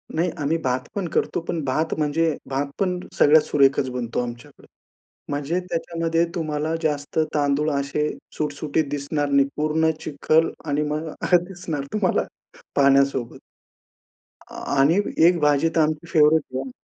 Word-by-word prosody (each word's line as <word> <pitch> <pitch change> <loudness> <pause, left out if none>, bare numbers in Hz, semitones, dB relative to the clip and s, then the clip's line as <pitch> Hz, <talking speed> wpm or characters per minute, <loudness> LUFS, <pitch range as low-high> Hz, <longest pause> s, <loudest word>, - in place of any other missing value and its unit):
नाही 170 +2 +1
आम्ही 155 +4 +1
भात 130 0 -1
पण 195 -3 -2
करतो - - 0
पण 165 -3 -2
भात 155 +5 0
म्हणजे 155 +1 +1
भात 135 +1 -1
पण 180 -2 0 0.2
सगळ्यात 155 +1 +6
सुरेखच 135 -2 +2
बनतो 125 -2 -3
आमच्याकडे. 120 +4 -9 0.6
म्हणजे 145 +5 -1
त्याच्यामध्ये 165 0 0
तुम्हाला 155 -1 -2
जास्त 150 0 -1
तांदूळ 145 +1 +1
असे 140 +1 -1 0.3
सुटसुटीत 150 +1 -1
दिसणार 145 0 -2
नाही, 140 0 +4
पूर्ण 155 +1 +2
चिखल 155 +2 +1 0.2
आणि 145 -1 0
मग 155 +2 -3 0.2
अ, - - +8
दिसणार 175 -5 -5
तुम्हाला 210 -4 +1 0.5
पाण्यासोबत. 140 -3 +2 1.1
आ - - -10 0.2
आणि 155 +7 +4 0.3
एक 175 -1 +3
भाजी 150 +1 +3
तर 165 - +3
आमची 155 +1 -1
फेव्हरेट 150 -4 +3
आहे. 135 0 -4
150 Hz, 140 wpm, -23 LUFS, 140-165 Hz, 1.1 s, अ